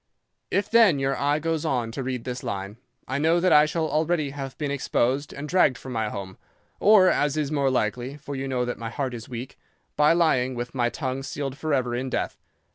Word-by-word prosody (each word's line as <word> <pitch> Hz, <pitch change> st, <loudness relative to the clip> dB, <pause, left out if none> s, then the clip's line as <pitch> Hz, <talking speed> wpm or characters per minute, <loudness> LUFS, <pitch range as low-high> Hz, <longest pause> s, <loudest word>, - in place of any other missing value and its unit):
"'If 200 Hz, -, 0 dB
then 225 Hz, -9 st, +6 dB
your 135 Hz, 0 st, 0 dB
eye 145 Hz, +1 st, +1 dB
goes 160 Hz, 0 st, -1 dB
on 120 Hz, -4 st, -1 dB
to 135 Hz, -, -4 dB
read 125 Hz, -2 st, -3 dB
this 125 Hz, -1 st, -5 dB
line, 100 Hz, -3 st, -5 dB, 0.3 s
I 135 Hz, +2 st, -2 dB
know 165 Hz, +3 st, +3 dB
that 185 Hz, +1 st, +3 dB
I 150 Hz, 0 st, +7 dB
shall 160 Hz, 0 st, -1 dB
already 155 Hz, -2 st, 0 dB
have 135 Hz, -2 st, -7 dB
been 145 Hz, -2 st, -2 dB
exposed 135 Hz, 0 st, 0 dB
and 145 Hz, +2 st, -6 dB
dragged 150 Hz, -6 st, +3 dB
from 130 Hz, 0 st, -8 dB
my 110 Hz, -2 st, -1 dB
home, 95 Hz, -2 st, -7 dB, 0.4 s
or 205 Hz, -3 st, +6 dB
as 145 Hz, -4 st, +2 dB
is 150 Hz, -2 st, -1 dB
more 140 Hz, -3 st, +2 dB
likely, 125 Hz, +2 st, -1 dB
for 145 Hz, -1 st, -7 dB
you 135 Hz, 0 st, -3 dB
know 125 Hz, -2 st, 0 dB
that 125 Hz, -, -4 dB
my 115 Hz, 0 st, -4 dB
heart 130 Hz, +1 st, -3 dB
is 115 Hz, -2 st, -8 dB
weak, 125 Hz, +2 st, -7 dB, 0.4 s
by 150 Hz, +2 st, +5 dB
lying 130 Hz, -7 st, +2 dB
with 120 Hz, 0 st, -5 dB
my 120 Hz, -2 st, +1 dB
tongue 130 Hz, 0 st, -3 dB
sealed 135 Hz, 0 st, -4 dB
forever 135 Hz, -5 st, -1 dB
in 130 Hz, +2 st, -2 dB
death. -, -, -3 dB
135 Hz, 215 wpm, -25 LUFS, 125-150 Hz, 0.4 s, I